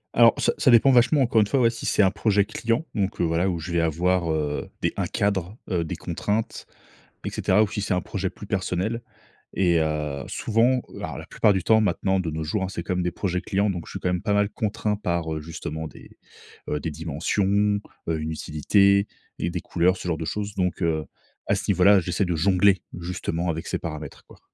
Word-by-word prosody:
Alors 115 -1 +7
ça - - +2
ça 150 - +4
dépend 120 +3 +6
vachement 130 +4 +4
encore 115 -2 +3
une 105 - +2
fois, 135 +5 +1
ouais, 115 -1 +4
si 115 - -6
c'est 105 - +3
un 95 - +4
projet 105 -1 +2
client. 115 +10 -1
Donc 100 0 -2
heu, - - +2
voilà, 85 +3 +1
où 85 - -1
je 80 +2 -6
vais 85 -1 +2
avoir, 85 +1 +1
heu, 75 -2 -2
des - - +1
un - - -1
cadre, 100 0 -1
heu, 85 -2 +1
des 80 - -4
contraintes, 110 +2 -3 0.6
et - - -2
cetera. 100 +3 +2
Ou 105 - +1
si 105 - -4
c'est 100 -1 0
un 90 - 0
projet 95 -1 -3
plus 105 - -11
personnel 95 +3 -1 0.5
et 85 -3 +3
heu, 75 -3 -2
souvent, 120 +3 +1 0.2
alors - - -5
la - - -7
plupart 105 - +2
du 95 - -1
temps 110 0 +5
maintenant 95 -1 +1
de 85 - -2
nos 80 0 -4
jours, 95 +6 -1
hein, 95 - -3
c'est 85 -3 -5
quand 90 - -2
même 90 - 0
des 90 - 0
projets 90 0 -2
clients 100 0 0
donc 85 -4 -5
je - - -10
suis - - -4
quand 90 - 0
même 90 -1 -1
pas 100 - +1
mal 105 0 +2
contraint 105 -1 -1
par, 85 -5 -2
heu, 80 - -4
justement 80 0 -6
des, - - -15 0.6
heu, 75 - -1
des 80 - -4
dimensions, 100 +7 0 0.3
heu, 80 -1 0
une 80 +1 -3
utilité 100 +6 +3 0.3
et 85 - -1
des 90 0 -3
couleurs, 90 +3 +1
ce 90 - -7
genre 80 - 0
de 80 - -4
choses. 105 +3 -4
Donc 90 0 -1
heu, 80 -2 +1 0.4
à - - +3
ce - - -4
niveau 90 - +3
là, 100 +1 +7
j'essaie 90 +2 -1
de 90 -2 -1
jongler 95 +1 +3 0.2
justement 85 0 -3
avec 80 0 -3
ces - - -2
paramètres, 75 -2 -7
quoi. - - -17
95 Hz, 230 wpm, -24 LUFS, 85-105 Hz, 0.6 s, Alors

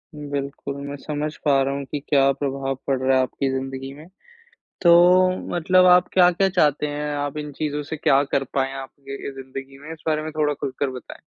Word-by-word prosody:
बिल्कुल, 140 -1 -5
मैं 140 - -5
समझ 150 +1 -4
पा 140 -2 +4
रहा 135 +1 -1
हूँ 140 0 -4
कि 145 - -2
क्या 135 -1 +4
प्रभाव 135 -1 -3
पड़ 135 -1 +1
रहा 130 0 +3
है - - +4
आपकी 135 +1 -2
ज़िंदगी 135 0 -5
में। 150 +3 -13 0.7
तो 170 -2 +7 0.6
मतलब 185 +2 +4
आप 180 0 +6
क्या-क्या 180 +1 +4
चाहते 150 -5 +2
हैं, 150 0 -3
आप 145 0 -3
इन 150 -1 -5
चीज़ों 150 0 -3
से 160 +2 -6
क्या 140 -1 +3
कर 135 - +1
पायें 135 0 0
आपके 135 +1 -8
ए, - - -4
ज़िंदगी 135 +1 -9
में? 150 +3 -10
इस 160 0 -15
बारे 155 -1 +1
में 155 - -5
थोड़ा 150 -1 +2
खुलकर 140 -1 -3
बताएँ। 130 -1 -9
145 Hz, 200 wpm, -23 LUFS, 135-150 Hz, 0.7 s, तो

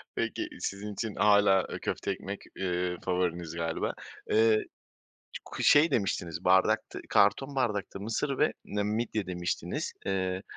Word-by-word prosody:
Peki - - -2
sizin 100 +1 -4
için 110 0 -4
hâlâ, 100 -2 +5
ııı, - - -5
köfte - - -2
ekmek, - - -5 0.2
ııı, 90 -1 -1
favoriniz 90 -3 -1
galiba. 80 0 -2 0.4
Iıı, 110 0 +4 0.8
ku - - -6
şey, 150 +2 +6
demiştiniz 90 - -1
bardakta, 95 +4 +3
karton 135 +7 +3
bardakta 105 -6 -1
mısır 115 +7 -2
ve 150 - +3
ne 105 0 -2
midye 110 -1 -1
demiştiniz. 90 -1 -3
Iıı, 95 -1 -1
100 Hz, 130 wpm, -29 LUFS, 90-110 Hz, 0.8 s, şey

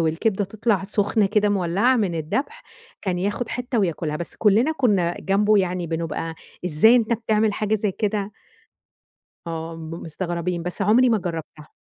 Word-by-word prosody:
والكبدة 180 +6 0
تطلع 210 0 0
سخنة 205 +1 +1
كده 210 +1 +2
مولّعة 200 +6 +2
من 200 -7 0
الدبح، 265 - -3 0.4
كان 185 -3 -1
ياخد 205 +5 -2
حتة 245 0 -2
وياكلها. 165 -5 -1
بس 170 - -6
كلّنا 225 +9 +3
كنا 200 - +1
جنبه 205 +2 +3
يعني 180 -2 -1
بنبقى 165 0 -3 0.3
"إزاي 180 +8 +5
أنت 235 -1 +1
بتعمل 220 -1 +1
حاجة 215 +1 0
زي 210 -1 0
كده؟!" 205 0 -2 1.1
آه، 165 0 -5
م 160 -1 -8
مستغربين، 170 +1 -3
بس 180 +3 -3
عمري 230 +6 +5
ما 225 -2 +3
جرّبْتها. 165 -4 -6
195 Hz, 150 wpm, -23 LUFS, 170-220 Hz, 1.1 s, إزاي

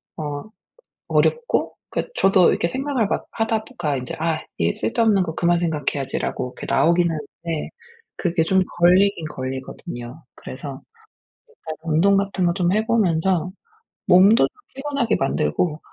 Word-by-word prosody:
어 145 -2 -4 0.7
어렵고 475 0 +1
그 - - -3
저도 190 -2 +5
이렇게 170 - 0
생각을 265 -3 -1
막 - - -1
하다 225 -1 -1
보 - - -16
가 150 -5 0
인제 125 -1 -5
'아 160 0 0 0.4
쓸데없는 200 - +2
거 160 -3 -4
그만 175 0 +2
생각해야지.'라고 140 -5 -2
이렇게 - - -6
나오기는 170 -1 +3 0.3
네. 165 -3 -3 0.5
그게 170 -2 0
좀 190 +3 +3 0.2
걸리긴 180 0 +4
걸리거든요. 130 +1 -7
그래서 135 +1 -8 0.7
일단 160 - -8
운동 170 +5 +3
같은 195 -2 0
거 170 - +3
좀 180 -2 +1
해 215 +2 +1
보면서 185 -5 +1 0.6
몸도 195 +5 +6
좀 - - -23 0.3
피곤하게 275 -4 -1
만들고 145 - 0
175 Hz, 300 characters per minute, -22 LUFS, 155-200 Hz, 0.7 s, 몸도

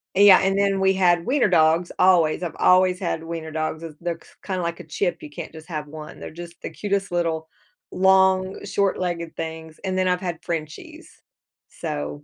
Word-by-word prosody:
Yeah, 200 -1 +8
and 195 +1 +1
then 200 -1 +2
we 190 0 +3
had 175 -2 +3
wiener 255 -1 +2
dogs 165 0 +3
always, 180 -3 +4
I've 165 -2 -4
always 185 0 +4
had 170 -3 -2
wiener 165 -1 -6
dogs, 155 +1 -3
as 155 -2 -8
they're 170 -1 -2
they're - - -20 0.3
kinda 185 -2 -2
like 170 0 -3
a - - -8
chip, 180 -3 -2
you 150 - -8
can't - - -8
just 160 +1 -11
have 155 -3 -5
one. 155 0 -10
They're - - -8
just 170 +1 -10
the - - -5
cutest 195 +4 -2
little, 165 -2 -1 0.4
long 190 0 +3
short-legged 180 -4 -1
things, 160 -1 -7
and 185 -1 -2
then 185 0 +2
I've 180 0 +1
had 175 -3 -4
Frenchies. 155 -3 -6 0.6
So 75 0 -5
175 Hz, 190 wpm, -23 LUFS, 160-190 Hz, 0.6 s, Yeah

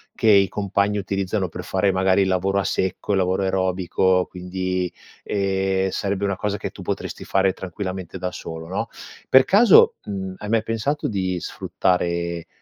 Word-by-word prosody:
che 110 - +2
i 100 -1 +6
compagni 100 +1 0
utilizzano 95 -1 -2
per - - -7
fare 95 +1 +1
magari 95 +1 +3
il 95 - +2
lavoro 95 +2 +1
a - - 0
secco, 95 +2 -2
il 100 - +3
lavoro 95 +1 +1
aerobico, 95 0 +1
quindi, 90 0 -3 0.3
ehm, 95 -1 0
sarebbe 100 +1 -2
una 100 -1 0
cosa 105 -1 -2
che - - -4
tu - - -11
potresti - - -4
fare 95 -1 +2
tranquillamente 95 -1 -6
da 90 0 -3
solo 80 -2 -7
no? 95 - -2 0.4
Per 130 0 +7
caso, 205 - +6
mhmm, 95 -2 -5
hai 105 - -7
mai 115 -1 +2
pensato 115 +7 -1
di 95 -3 -1
sfruttare 85 -2 -1
95 Hz, 165 wpm, -22 LUFS, 95-100 Hz, 0.4 s, Per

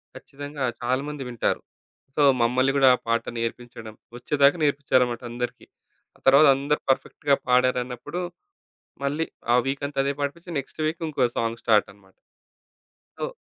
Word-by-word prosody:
ఖచ్చితంగా 145 0 -7 0.2
చాలామంది 135 +3 -2
వింటారు. 120 -3 -1 0.5
సో 150 - +1 0.2
మమ్మల్ని 130 +3 +3
గూడా 135 -1 +6
ఆ - - -9
పాట 115 0 +1
నేర్పించడం. 115 -1 -5 0.2
ఒచ్చేదాకా 140 +5 +3
నేర్పించారన్నమాట 130 -4 +1
అందరికి. 120 0 -5 0.5
ఆ - - -27
తరువాత 140 +3 +7
అందరూ 145 +2 -1
పర్ఫెక్ట్‌గా 140 +1 +1
పాడారన్నప్పుడు, 125 +5 0 0.8
మళ్ళీ 150 +4 0 0.3
ఆ - - +6
వీకంతా 140 +1 -3
అదే 140 +1 0
పాడిపిచ్చి 170 +5 -4
నెక్స్ట్ 140 +3 -8
వీక్ 165 +1 -4
ఇంకో 135 -5 +1
సాంగ్ 115 0 -2
స్టార్టన్నమాట. 100 -3 0 1.1
ఓ - - 0
135 Hz, 125 wpm, -25 LUFS, 120-145 Hz, 1.1 s, తరువాత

